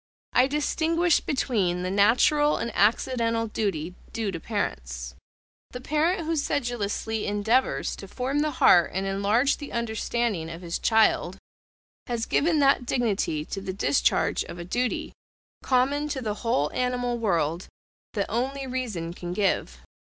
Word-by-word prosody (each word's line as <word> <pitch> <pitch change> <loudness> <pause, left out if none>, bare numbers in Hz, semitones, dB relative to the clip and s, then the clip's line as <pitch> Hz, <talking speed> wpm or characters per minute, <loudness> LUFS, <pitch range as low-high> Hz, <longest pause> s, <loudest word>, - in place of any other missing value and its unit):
I 255 +1 +5
distinguish 325 +3 +1
between 195 - 0
the 185 - -2
natural 250 +9 +4
and 235 - -3
accidental 230 +2 +2
duty 190 -6 -2 0.2
due 220 -3 -2
to 165 - -5
parents. 60 - -4 0.6
The 250 - -7
parent 315 +6 0
who 330 +1 0
sedulously 225 -6 -2
endeavours 220 +5 +1
to 195 - -9
form 260 +8 -2
the 305 +1 +1
heart 175 -1 +6
and 190 +1 -1
enlarge 200 +7 +2
the 290 - -8
understanding 225 -5 -1
of 165 +2 -8
his 170 -1 -3
child, 220 -4 +2 0.7
has 235 -1 -2
given 325 +2 +2
that 275 -3 +3
dignity 200 - 0
to 195 - -5
the 190 -1 -4
discharge 200 +8 +1
of - - -9
a 175 - -6
duty, 245 +6 -2 0.5
common 275 +3 +1
to 275 -3 -3
the 215 -2 -1
whole 150 - +1
animal 245 -1 -1
world, 170 -5 0 0.5
that 200 -2 0
only 265 +4 -2
reason 225 -11 -4
can 175 0 -6
give. 200 +1 -1
230 Hz, 145 wpm, -26 LUFS, 195-260 Hz, 0.7 s, heart